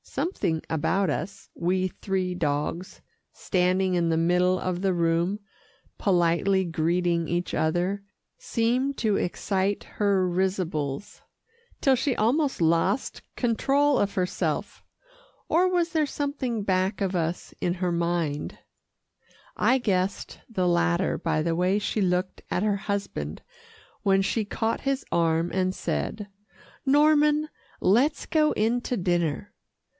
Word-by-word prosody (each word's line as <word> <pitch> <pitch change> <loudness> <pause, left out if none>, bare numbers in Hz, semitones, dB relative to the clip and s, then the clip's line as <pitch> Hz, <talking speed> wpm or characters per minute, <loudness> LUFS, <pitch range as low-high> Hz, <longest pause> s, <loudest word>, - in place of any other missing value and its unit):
Something 170 - -2
about 185 +4 +1
us 195 +6 -5
we 185 +2 0
three 185 -1 -2
dogs 160 +2 -2 0.3
standing 185 0 +1
in 170 -2 +1
the 165 - +1
middle 180 +2 +2
of 180 -1 -2
the 195 -1 +1
room, 170 +3 +1 0.6
politely 185 +1 +2
greeting 170 +1 0
each 175 +1 -2
other, 175 +5 0 0.3
seemed 260 - 0
to 215 -3 +1
excite 195 +2 -1
her 200 -3 +1
risibles, 180 -4 -2 0.6
till 270 -1 +4
she 255 0 0
almost 270 +6 +1
lost 165 +10 +1
control 275 +4 +2
of 200 0 0
herself. 180 -1 -2 0.6
Or 360 +3 +3
was 350 -2 +1
there 315 -3 +1
something 270 -7 -2
back 190 +1 0
of 195 -2 -1
us 170 0 -2
in 175 0 0
her 180 -1 -1
mind? 170 -3 -1 1.0
I 260 - +3
guessed 195 -5 -1
the 185 -5 0
latter 175 +1 +1
by 155 - 0
the 165 0 0
way 180 +3 +2
she 210 +1 -1
looked 180 0 0
at 180 - 0
her 210 -1 +2
husband 195 - -4 0.6
when 195 -1 +3
she 210 +2 0
caught 225 +2 -2
his 275 0 -1
arm 165 0 +1
and 185 0 0
said, 210 -2 -3 0.6
"Norman, 300 +1 +4 0.3
let's 250 +10 +2
go 305 -1 +2
in 230 +3 +1
to 250 - -2
dinner." 175 0 0
190 Hz, 130 wpm, -26 LUFS, 175-225 Hz, 1.0 s, till